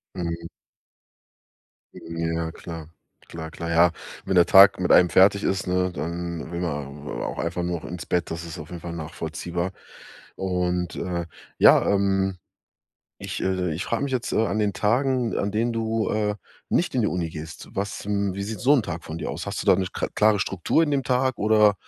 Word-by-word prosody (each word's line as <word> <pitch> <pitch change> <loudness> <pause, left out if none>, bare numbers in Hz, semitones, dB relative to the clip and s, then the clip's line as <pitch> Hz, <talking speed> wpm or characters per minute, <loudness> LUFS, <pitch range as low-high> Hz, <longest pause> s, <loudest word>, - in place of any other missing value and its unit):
Mhm. 85 -2 -4 1.5
Ja, 80 0 -3
klar. 80 -2 -8 0.4
Klar, 80 -1 -7
klar. 85 0 -6
Ja, 85 +1 +5 0.3
wenn 95 - 0
der 90 -1 +7
Tag 95 +2 +8
mit 90 - +1
einem 90 - +7
fertig 95 +4 +5
ist, 95 -1 -1
ne, 90 0 +1
dann 85 0 -4
will 85 0 -3
man, 75 -3 -4
äh, - - -5
auch - - -4
einfach 85 +1 -2
nur 85 -1 -2
noch - - -10
ins 85 0 -6
Bett, 90 -2 -1
das 85 +1 -5
ist 85 - -7
auf 75 - -9
jeden 85 - -7
Fall 85 -1 -6
nachvollziehbar. 85 +2 -4 0.6
Und, 90 -2 -1
äh, 85 -2 -3 0.3
ja, - - +7
ähm 95 -1 +1 0.8
ich, - - -5
äh, 95 -2 0
ich 85 - -3
frage 115 +4 -1
mich 140 - -3
jetzt 125 -1 -2
an 110 -2 +1
den 105 -1 +1
Tagen, 120 +4 +1
an 100 - -1
denen 115 +3 0
du, 115 -1 -1
äh, 105 -1 0 0.3
nicht 175 - +1
in 125 - +2
die 105 - +2
Uni 85 -3 -2
gehst. 80 +1 -8
Was 100 +1 -4
wie 100 -1 -1
sieht 110 +1 -5
so 135 +3 +4
'n 130 - +3
Tag 85 -2 -5
von 80 +1 -6
dir 80 - -4
aus? - - -5
Hast - - -3
du - - -11
da - - +7
'ne 95 -1 -1
kr - - -2
klare 105 -1 +4
Struktur 95 - +1
in 150 - -2
dem 140 - +1
Tag, 130 0 +1
oder, 105 -1 +5
90 Hz, 195 wpm, -24 LUFS, 85-105 Hz, 1.5 s, Tag